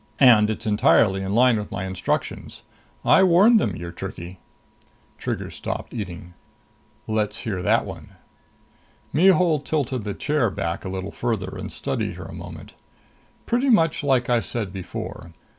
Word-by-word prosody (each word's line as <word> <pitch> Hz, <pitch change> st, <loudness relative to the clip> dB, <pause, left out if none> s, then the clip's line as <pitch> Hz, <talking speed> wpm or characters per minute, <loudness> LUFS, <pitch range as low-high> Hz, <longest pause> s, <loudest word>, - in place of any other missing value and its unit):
And 115 Hz, -6 st, +6 dB
it's 110 Hz, -, -4 dB
entirely 105 Hz, -2 st, +3 dB
in 95 Hz, +1 st, -2 dB
line 125 Hz, -1 st, +5 dB
with 105 Hz, -, -7 dB
my 95 Hz, -, -3 dB
instructions. 95 Hz, -1 st, -3 dB, 0.4 s
I -, -, +6 dB
warned 190 Hz, +6 st, +6 dB
them 100 Hz, -, -1 dB
you're 85 Hz, 0 st, -6 dB
tricky." 90 Hz, 0 st, -8 dB, 0.8 s
Trigger -, -, -4 dB
stopped -, -, -5 dB
eating. 90 Hz, -5 st, -6 dB, 0.7 s
"Let's 110 Hz, 0 st, -1 dB
hear 105 Hz, -7 st, -3 dB
that 90 Hz, -, +2 dB
one." -, -, -10 dB, 1.0 s
Mihul 180 Hz, -2 st, +4 dB
tilted 135 Hz, -5 st, -2 dB
the 100 Hz, -1 st, -4 dB
chair 145 Hz, -6 st, +1 dB
back 85 Hz, -3 st, -3 dB
a 95 Hz, -, -5 dB
little 95 Hz, +1 st, -5 dB
farther 105 Hz, -6 st, -3 dB
and -, -, -6 dB
studied -, -, -3 dB
her -, -, -8 dB
a -, -, -9 dB
moment. -, -, -10 dB, 0.7 s
"Pretty 245 Hz, +4 st, +1 dB
much 165 Hz, -10 st, +3 dB
like 130 Hz, -4 st, +2 dB
I 120 Hz, -1 st, +3 dB
said 110 Hz, -4 st, -4 dB
before. 90 Hz, -2 st, -7 dB
110 Hz, 150 wpm, -23 LUFS, 95-145 Hz, 1.0 s, And